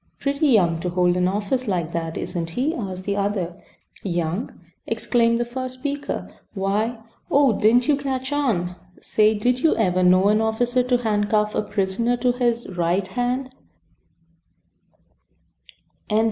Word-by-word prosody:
"Pretty 280 +2 0
young 175 - +3
to 180 - -2
hold 180 0 +2
an 180 0 +2
office 210 +6 -1
like 175 -5 -1
that, 165 -1 -3
isn't 165 -2 -3
he?" 260 - -1
asked 190 - -5
the 200 +1 -1
other. 195 -3 -2 0.4
"Young!" 175 +3 -2 0.4
exclaimed 230 -1 +2
the 240 - -1
first 255 +1 -5
speaker, 285 +2 -4 0.3
"why 205 +5 0 0.3
Oh! 280 -4 +4
didn't 235 +5 +3
you 295 - +4
catch 265 -1 -3
on? 195 -12 0 0.2
Say 215 0 +2
did 245 +4 +1
you 315 +4 +3
ever 185 -4 +1
know 185 +2 +5
an 215 +1 +3
officer 240 +3 +1
to 250 0 +2
handcuff 210 -1 +1
a - - +1
prisoner 210 +4 -1
to 245 +1 +2
his 240 -1 0
~right~ 175 +1 0
hand?" 250 +6 -2
215 Hz, 145 wpm, -23 LUFS, 185-250 Hz, 0.4 s, know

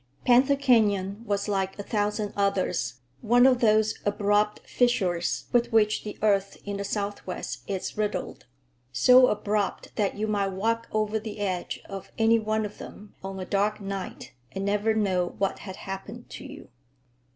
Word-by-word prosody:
Panther 260 +3 +5
Canyon 210 -7 +2
was 200 0 -1
like 195 -2 -1
a 205 - -5
thousand 210 0 -1
others—one 185 - +1
of 255 -2 +5
those 215 -1 +3
abrupt 205 0 +1
fissures 185 -9 +1
with 240 0 +2
which 215 -1 +3
the 210 - -7
earth 200 -2 +2
in 200 0 -3
the 200 - -3
Southwest 200 -2 -4
is 190 -2 -3
riddled; 210 -1 -3 0.4
so 250 - +6
abrupt 210 -2 -1
that 205 -2 0
you 215 - -1
might 200 -2 0
walk 230 +4 -1
over 215 0 0
the 215 0 -7
edge 185 -3 -3
of 195 -1 -8
any 225 0 +4
one 215 0 -1
of 210 - -8
them 205 0 -11
on 195 0 -5
a 185 - -4
dark 205 +2 0
night 195 -2 -6 0.2
and 195 0 -4
never 210 +2 +1
know 185 -4 0
what 195 -1 -1
had 190 -2 -8
happened 200 +5 -7
to - - -8
you. - - -11
205 Hz, 160 wpm, -27 LUFS, 195-220 Hz, 0.4 s, so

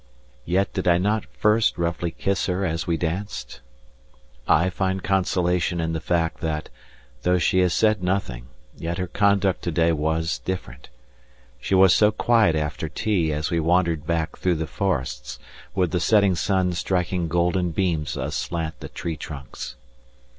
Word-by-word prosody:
Yet 95 +2 +1
did - - -2
I 85 -1 +5
not 105 +2 0
first 105 - +2
roughly 85 0 -1
kiss 95 +3 -1
her 95 +1 0
as 80 -2 -2
we 85 -1 +1
danced? 90 +6 -4 0.9
I 90 +4 +3
find 95 +1 -1
consolation 90 -2 +1
in 80 0 -1
the 80 - -1
fact 85 +1 -1
that, 80 -2 -3 0.5
though 90 0 +2
she 90 +2 +2
has 90 -1 +3
said 110 -3 +3
nothing, 90 -11 -2 0.3
yet 85 +1 -4
her 90 - -1
conduct 100 0 +2
to 85 - 0
day 85 +1 +3
was 80 +1 -1
different. 65 -9 -6 0.7
She 95 - 0
was 95 -2 +7
so 105 +5 +5
quiet 110 -6 +3
after 75 -2 -2
tea 90 -7 0
as 75 +3 -2
we 85 - +1
wandered 85 -2 +1
back 85 -1 -1
through 90 -2 +1
the 80 0 -2
forests 65 -10 -3 0.4
with 90 -3 +1
the 90 - +1
setting 100 +1 +4
sun 90 0 +1
striking 90 0 -1
golden 90 +2 +1
beams 80 -3 -1
aslant 80 -2 -3
the - - -8
tree 80 -2 -5
trunks. 70 -5 -8
85 Hz, 160 wpm, -24 LUFS, 80-95 Hz, 0.9 s, was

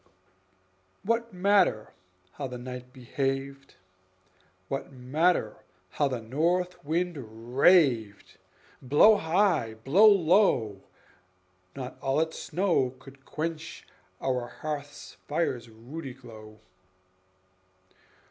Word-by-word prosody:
What 230 +2 -1
matter 185 - +2 0.4
how 140 +5 -5
the 125 -1 -7
night 125 0 -8
behaved? 135 +2 -4 0.9
What 135 +5 -4
matter 135 0 0 0.3
how 145 - +1
the 130 -3 -3
north 175 +9 -1
wind 170 +2 -1 0.4
raved? 130 - +3 0.4
Blow 150 - +6
high, 170 - +1
blow 145 - +5
low, 170 - +3 0.9
not 130 -1 -7
all 135 +2 +1
its 160 0 -2
snow 170 -9 0
Could 135 0 -16
quench 160 +1 -5 0.3
our 125 -2 -1
hearth 145 0 -7
fire's 140 -7 -2
ruddy 125 +5 -9
glow. 110 -4 -13
140 Hz, 90 wpm, -28 LUFS, 125-170 Hz, 0.9 s, Blow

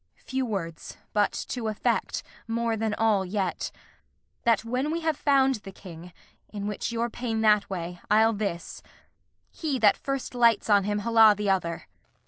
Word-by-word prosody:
Kent. - - -25
Few 265 0 0
words, 165 -7 -5 0.2
but, 205 -1 +2 0.2
to 240 -3 -3
effect, 215 -1 -1 0.2
more 230 0 0
than 220 -1 -1
all 215 -3 +2
yet: 190 0 -2 0.8
That, 230 -1 +3
when 250 +5 -1
we 335 +2 -2
have 320 -1 0
found 270 -2 +3
the 195 -2 -11
King 180 -2 -11 0.4
(in 205 -1 -6
which 210 +2 -3
your 235 0 -1
pain 225 -1 -3
That 210 -2 +4
way, 175 -2 -5
I'll 220 +2 +5
this), 200 -5 -4 0.7
he 300 -5 -2
that 215 -4 +5
first 275 -2 -4
lights 235 -3 +3
on 200 -2 +5
him 205 0 -1
Holla 225 -2 +6
the 205 -1 +1
other. 170 -3 -1
215 Hz, 165 wpm, -27 LUFS, 200-235 Hz, 0.8 s, Holla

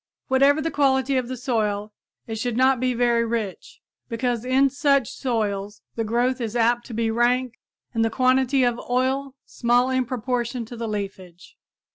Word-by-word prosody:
Whatever 280 +3 +4
the 325 - -1
quality 270 -1 +2
of 255 -2 0
the 255 0 -5
soil, 215 -4 -1 0.3
it 220 -1 -5
should 240 0 -2
not 260 0 +4
be 255 0 0
very 235 -1 +2
rich, 225 -4 -4 0.3
because 240 -1 -1
in 265 +2 +3
such 275 -3 +2
soils 210 -4 -3
the 230 - -1
growth 245 +3 0
is 225 -1 -3
apt 240 +1 +2
to 230 - -7
be 225 0 0
rank 240 +1 +1 0.3
and 225 -1 +1
the 225 - +2
quantity 260 +2 +2
of 240 -1 0
oil 260 +2 0
small 245 +2 +1
in 260 -1 +1
proportion 245 0 -2
to 240 - -9
the 230 0 -4
leafage. 195 -4 -6
245 Hz, 170 wpm, -23 LUFS, 225-260 Hz, 0.3 s, Whatever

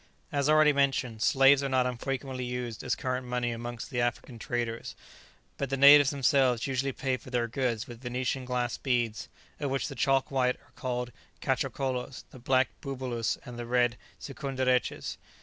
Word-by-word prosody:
As 140 0 +1
already 155 -1 +6
mentioned, 135 -5 0
slaves 135 +2 +5
are 140 - -1
not 130 -1 +2
unfrequently 130 +1 -3
used 125 -2 -4
as 125 - 0
current 130 0 -2
money 125 -1 -1
amongst 120 +3 -6
the 120 -2 0
African 120 0 -3
traders, 115 0 -3 0.6
but 140 - -2
the 135 - -1
natives 140 0 +8
themselves 135 -4 +2
usually 135 0 -1
pay 130 0 -1
for 130 - -13
their 120 -2 0
goods 120 -2 -1
with 120 -2 -11
Venetian 130 +1 -2
glass 125 -1 -2
beads, 120 -4 -1 0.3
of 145 - -2
which 135 +3 -1
the - - -6
chalk 135 +1 +1
white 125 -2 +2
are 145 - -26
called 125 -2 -3 0.3
catchokolos, 130 -1 -2
the 130 - -12
black 130 +1 +2
bubulus, 130 -5 -2
and 120 -1 -8
the 120 - -5
red 120 -1 +2 0.2
sikunderetches. 130 -3 -1
130 Hz, 165 wpm, -29 LUFS, 120-135 Hz, 0.6 s, natives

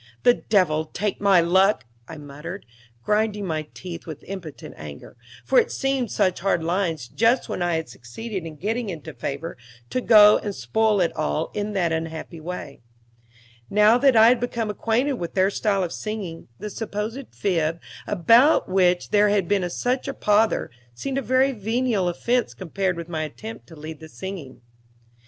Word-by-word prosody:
"The 245 - +7
devil 180 -10 +1
take 200 +6 -3
my 195 -3 +5
luck!" 190 - +3 0.2
I 160 - -8
muttered, 150 +6 -8 0.4
grinding 210 - 0
my 155 -3 -3
teeth 175 -2 -8
with 155 -3 -8
impotent 185 -6 -8
anger; 75 +5 -10 0.3
for - - +5
it - - 0
seemed 270 -3 -1
such 185 -3 +1
hard 175 -3 +1
lines, 165 -6 -1
just 230 - +2
when - - -4
I 175 -1 +1
had 160 0 -2
succeeded 190 - -7
in 160 -2 -8
getting 220 +7 -2
into 160 -3 -7
favor, 145 +4 -5 0.3
to 255 - 0
go 210 -3 +7
and 205 -2 -5
spoil 205 - +1
it 170 - 0
all 75 0 -1
in 210 0 -3
that 175 -4 +1
unhappy 160 +1 -4
way. 180 -3 -7 0.9
Now 210 +4 +5
that 270 -1 +4
I 225 +1 +8
had 245 0 +3
become 235 -3 -2
acquainted 230 +7 0
with 170 - -5
their 190 +1 +3
style 200 -2 0
of 170 - -3
singing, 205 -7 -5
the 210 - -6
supposed 225 +5 -5
fib, 165 -4 0 0.3
about 230 - +5
which 180 -1 +2
there 210 0 +5
had 200 -4 +1
been 190 -2 +1
such 250 +9 -1
a 275 - -3
pother, 210 - +2 0.2
seemed 270 - -2
a - - -3
very 260 +3 +3
venial 220 -3 0
offense 235 +7 0
compared 185 0 -2
with 170 -1 -6
my 160 -3 -3
attempt 215 +9 -7
to 165 - -13
lead 155 0 -8
the 160 - -11
singing. 175 -10 -8
195 Hz, 175 wpm, -24 LUFS, 165-220 Hz, 0.9 s, I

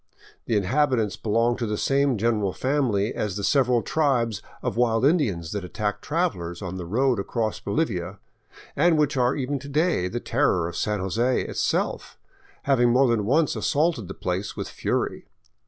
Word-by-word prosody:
The 115 - 0
in 100 - +2
habitants 125 -1 +1
belong 115 +2 +1
to 120 - -2
the 105 0 -2
same 140 -1 +2
general 105 -3 0
family 125 -7 0
as 105 -4 -3
the 100 - -4
several 125 0 +3
tribes 120 -9 0 0.2
of - - -2
wild 115 0 +2
Indians 105 - +1
that 100 -2 -3
attack 105 +2 -3
travelers 140 - -2
on 95 -2 -5
the 90 -2 -6
road 125 +4 +1
across 110 +2 -2
Bolivia, 100 - -2 0.6
and 175 -2 +3
which 150 -1 +1
are 125 0 +2
even 140 0 -2
to 140 +2 -10
day 150 - +1
the 120 +6 -3
terror 115 - +1
of 85 - -7
San 105 -2 -1
Jose 115 +7 +1
itself, - - -2 0.5
having 120 -3 +3
more 130 +3 +4
than 115 -4 +1
once 150 +5 +2
assaulted 150 - 0
the 95 - -7
place 90 +3 -3
with - - -4
fury. - - -2
115 Hz, 170 wpm, -25 LUFS, 100-140 Hz, 0.6 s, more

